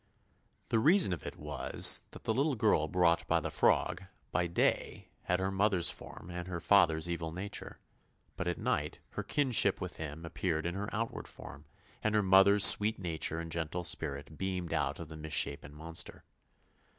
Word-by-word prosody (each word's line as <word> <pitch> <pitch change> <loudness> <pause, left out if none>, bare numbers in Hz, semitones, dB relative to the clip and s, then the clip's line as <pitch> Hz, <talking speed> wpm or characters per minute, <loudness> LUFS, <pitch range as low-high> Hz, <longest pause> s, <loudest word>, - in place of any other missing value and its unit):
The 115 - +2
reason 160 - +4
of 85 - -7
it - - -7
was - - +1
that - - -11
the 110 - 0
little 140 +4 +1
girl 105 -9 +2
brought 85 0 +2
by - - +2
the - - -5
frog, 95 - +1 0.3
by 90 - 0
day 85 - -1 0.2
had 90 +1 0
her 95 +1 -1
mother's 95 -3 +2
form 85 - -11
and 90 0 -6
her 90 -2 -4
father's 85 -4 +3
evil 85 -2 -4
nature; 95 +4 -6 0.6
but 95 - -4
at 90 - -1
night - - -2
her - - -4
kinship 135 -5 +2
with - - -6
him 80 +1 -7
appeared 80 -1 -2
in 85 - -2
her 100 +3 -4
outward 115 +1 -4
form, 75 +2 -12 0.4
and 110 0 0
her 105 - +3
mother's 95 +2 +6
sweet 110 +2 +7
nature 80 -3 -2
and 85 -1 -7
gentle 85 +2 -3
spirit 75 -3 -4
beamed 95 -2 -3
out - - -1
of 85 - -7
the 80 0 -10
misshapen 75 -2 -2
monster. 80 +2 -5
90 Hz, 175 wpm, -32 LUFS, 80-100 Hz, 0.6 s, sweet